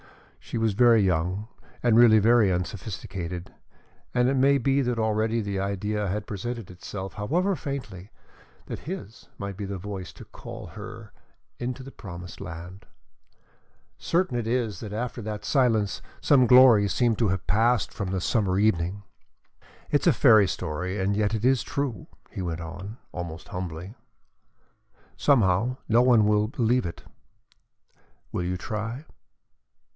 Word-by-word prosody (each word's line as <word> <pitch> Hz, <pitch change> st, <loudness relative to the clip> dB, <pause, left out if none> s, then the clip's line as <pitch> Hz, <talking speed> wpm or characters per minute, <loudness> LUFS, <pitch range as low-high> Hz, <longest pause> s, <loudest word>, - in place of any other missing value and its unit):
She -, -, -6 dB
was 110 Hz, -2 st, +1 dB
very 115 Hz, 0 st, +5 dB
young 90 Hz, +3 st, 0 dB, 0.4 s
and 120 Hz, -2 st, +4 dB
really 115 Hz, -2 st, +7 dB
very 110 Hz, -1 st, +4 dB
unsophisticated, 90 Hz, -1 st, -5 dB, 0.6 s
and 125 Hz, 0 st, +3 dB
it 135 Hz, -, +2 dB
may 135 Hz, +1 st, +4 dB
be 135 Hz, +2 st, +2 dB
that 125 Hz, -2 st, -1 dB
already 110 Hz, +1 st, +1 dB
the 100 Hz, -3 st, -2 dB
idea 100 Hz, +2 st, -2 dB
had 100 Hz, +2 st, -2 dB
presented 110 Hz, +1 st, -5 dB
itself, 95 Hz, +2 st, -7 dB
however 175 Hz, -, 0 dB
faintly, 125 Hz, -, -6 dB, 0.6 s
that -, -, -6 dB
his 155 Hz, -, -8 dB
might 100 Hz, -1 st, -5 dB
be 100 Hz, -, -6 dB
the 100 Hz, 0 st, -4 dB
voice 95 Hz, -2 st, -6 dB
to -, -, -12 dB
call -, -, -9 dB
her 110 Hz, +1 st, -10 dB, 0.5 s
into 125 Hz, +2 st, -4 dB
the 135 Hz, -, -10 dB
promised 90 Hz, -5 st, -9 dB
land. 90 Hz, +2 st, -8 dB, 1.1 s
Certain 170 Hz, -6 st, 0 dB
it 120 Hz, -2 st, -2 dB
is 115 Hz, -3 st, -1 dB
that 105 Hz, -3 st, -7 dB
after 120 Hz, +3 st, -4 dB
that 105 Hz, -1 st, -5 dB
silence 115 Hz, -7 st, +2 dB, 0.2 s
some 130 Hz, -4 st, +4 dB
glory 125 Hz, -5 st, +7 dB
seemed 120 Hz, -2 st, +1 dB
to 115 Hz, -, +3 dB
have 95 Hz, -1 st, -1 dB
passed 115 Hz, +4 st, +2 dB
from 100 Hz, -3 st, -4 dB
the 95 Hz, 0 st, -1 dB
summer 95 Hz, -1 st, +1 dB
evening. 100 Hz, -1 st, +1 dB, 0.9 s
"It -, -, +3 dB
is -, -, 0 dB
a -, -, +6 dB
fairy 105 Hz, -3 st, +6 dB
story 90 Hz, +3 st, -3 dB
and 100 Hz, +2 st, +1 dB
yet 105 Hz, +1 st, +1 dB
it 110 Hz, +2 st, -2 dB
is 130 Hz, -2 st, +4 dB
true," 135 Hz, -9 st, -3 dB, 0.2 s
he -, -, -5 dB
went 85 Hz, -2 st, -3 dB
on, 90 Hz, +7 st, -7 dB, 0.2 s
almost 85 Hz, -2 st, -6 dB
humbly. 90 Hz, +1 st, -6 dB, 1.2 s
"Somehow, 120 Hz, -2 st, +2 dB
no 115 Hz, +2 st, +5 dB
one 120 Hz, -4 st, +5 dB
will 105 Hz, 0 st, +3 dB
believe 120 Hz, -2 st, +1 dB
it. 85 Hz, -, -8 dB, 1.3 s
Will 90 Hz, -, -2 dB
you 90 Hz, +1 st, -2 dB
try?" 115 Hz, -, -5 dB
105 Hz, 150 wpm, -26 LUFS, 95-120 Hz, 1.3 s, really